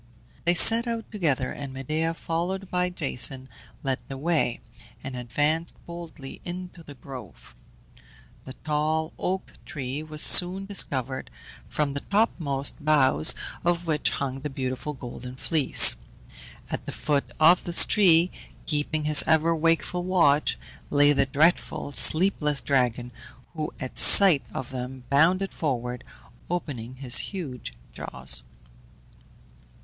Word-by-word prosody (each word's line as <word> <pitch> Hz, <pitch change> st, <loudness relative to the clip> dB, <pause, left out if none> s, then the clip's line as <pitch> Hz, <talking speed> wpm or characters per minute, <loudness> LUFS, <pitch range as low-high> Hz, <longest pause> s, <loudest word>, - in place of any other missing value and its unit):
They 175 Hz, +1 st, +1 dB
set 230 Hz, +6 st, +7 dB
out 230 Hz, -1 st, -6 dB
together, 150 Hz, -, -2 dB
and 140 Hz, -2 st, -8 dB
Medea, 155 Hz, +5 st, -4 dB
followed 180 Hz, +4 st, -5 dB
by 180 Hz, 0 st, -1 dB
Jason, 135 Hz, -5 st, -1 dB, 0.4 s
led 135 Hz, -2 st, -3 dB
the 135 Hz, -, -8 dB
way, 155 Hz, -4 st, -2 dB, 0.4 s
and 135 Hz, -1 st, -7 dB
advanced 145 Hz, +7 st, -3 dB
boldly 170 Hz, -5 st, -11 dB
into 180 Hz, 0 st, -9 dB
the 145 Hz, -3 st, -14 dB
grove. 130 Hz, -, -13 dB, 0.9 s
The 130 Hz, -, -10 dB
tall 155 Hz, +1 st, -2 dB
oak 190 Hz, +1 st, -5 dB
tree 135 Hz, 0 st, -7 dB
was 155 Hz, -1 st, -1 dB
soon 185 Hz, +2 st, +5 dB
discovered, 135 Hz, -, -3 dB, 0.4 s
from 145 Hz, -2 st, -3 dB
the 140 Hz, -, -4 dB
topmost 155 Hz, -8 st, -2 dB
boughs 135 Hz, -, +3 dB, 0.3 s
of 175 Hz, 0 st, -1 dB
which 155 Hz, -3 st, -1 dB
hung 135 Hz, -1 st, -5 dB
the 150 Hz, +2 st, -6 dB
beautiful 130 Hz, +2 st, -6 dB
Golden 125 Hz, -1 st, -10 dB
Fleece. 140 Hz, -, +5 dB, 0.8 s
At -, -, -5 dB
the -, -, -5 dB
foot 145 Hz, -2 st, -3 dB
of 165 Hz, +3 st, +4 dB
this 170 Hz, -1 st, +6 dB
tree, 180 Hz, -4 st, +2 dB, 0.3 s
keeping 150 Hz, +1 st, -3 dB
his 150 Hz, -1 st, +6 dB
ever 160 Hz, +1 st, +1 dB
wakeful 165 Hz, +2 st, -1 dB
watch, 165 Hz, -6 st, +1 dB, 0.3 s
lay 145 Hz, 0 st, +3 dB
the 135 Hz, -1 st, 0 dB
dreadful, 150 Hz, +1 st, -1 dB
sleepless 155 Hz, -2 st, +3 dB
dragon, 125 Hz, -3 st, -2 dB, 0.4 s
who 155 Hz, -2 st, -5 dB
at 130 Hz, -, -7 dB
sight 185 Hz, -8 st, +9 dB
of 130 Hz, -, -8 dB
them 130 Hz, 0 st, -8 dB
bounded 180 Hz, +7 st, +1 dB
forward, 125 Hz, -5 st, -5 dB, 0.5 s
opening 130 Hz, -9 st, -6 dB
his 130 Hz, -2 st, +2 dB
huge 150 Hz, -, -7 dB, 0.2 s
jaws. -, -, -1 dB
150 Hz, 125 wpm, -24 LUFS, 135-170 Hz, 0.9 s, sight